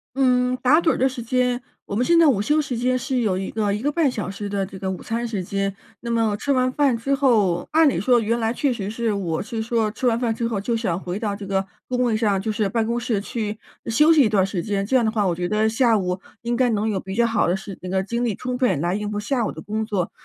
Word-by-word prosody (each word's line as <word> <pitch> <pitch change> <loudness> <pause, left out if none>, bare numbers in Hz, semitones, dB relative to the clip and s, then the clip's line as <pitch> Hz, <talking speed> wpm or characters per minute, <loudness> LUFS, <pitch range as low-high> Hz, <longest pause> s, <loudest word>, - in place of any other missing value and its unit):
嗯， 250 -1 +2
打 255 +5 +4
盹 330 - +3
儿 - - -1
的 260 - +3
时 255 -2 -5
间， 250 +1 0 0.2
我 200 - -5
们 235 - +2
现 340 +3 +4
在 335 - +6
午 235 -9 +3
休 300 +9 +2
时 275 -4 -4
间 255 +2 +1
是 255 0 -1
有 205 -6 +1
一 190 - -4
个 210 -2 0
1 210 - -3
个 290 +4 0
半 315 -2 +2
小 210 -7 -4
时 200 +1 -6
的 200 -1 -1
这 190 0 -10
个 190 - -3
午 185 -2 -5
餐 235 +1 -2
时 210 -5 -3
间， 195 +1 -2 0.2
那 235 - -6
么 225 -3 +1
吃 285 - -2
完 255 -1 +2
饭 270 -3 +2
之 275 +5 -1
后， 220 - +2
按 320 0 +5
理 265 - +1
说 240 +5 +4
原 230 +1 0
来 225 -1 0
确 270 +1 0
实 200 -4 -4
是 225 0 -1
我 175 -5 -2
是 225 0 -4
说 225 -1 0
吃 250 - -2
完 230 -1 +2
饭 235 -2 0
之 230 +1 -2
后， 225 -3 -2
就 230 +4 -1
想 195 -7 -1
回 185 +1 -4
到 210 -2 -2
这 200 0 -8
个 195 0 -1 0.2
工 250 0 -1
位 230 -3 +1
上， 205 -4 +1
就 220 - -2
是 215 -1 0
办 225 +2 0
公 235 +1 0
室 225 -4 -1
去 215 0 -4 0.3
休 300 +8 +4
息 315 -2 +6
一 235 - +4
段 200 -3 +3
时 190 -3 -3
间， 200 -2 -1
这 260 - 0
样 245 -3 +4
的 220 - +1
话 215 -2 0
我 175 - 0
觉 175 +1 -2
得 215 +3 +2
下 230 0 +3
午， 180 -1 -2 0.2
应 235 +1 -1
该 255 +1 +3
能 215 0 0
有 200 -3 -1
比 190 +1 -7
较 235 +3 +2
好 225 -2 +1
的 175 - +2
时 195 0 -7
那 185 - -6
个 190 +1 0
精 235 +4 -2
力 230 - 0
充 250 +5 -4
分 200 - +1
来 175 +3 0
应 210 0 -3
付 205 - -2
下 235 +2 -1
午 - - -2
的 - - -9
工 215 +1 -3
作。 195 -5 -2
225 Hz, 315 characters per minute, -22 LUFS, 200-250 Hz, 0.3 s, 在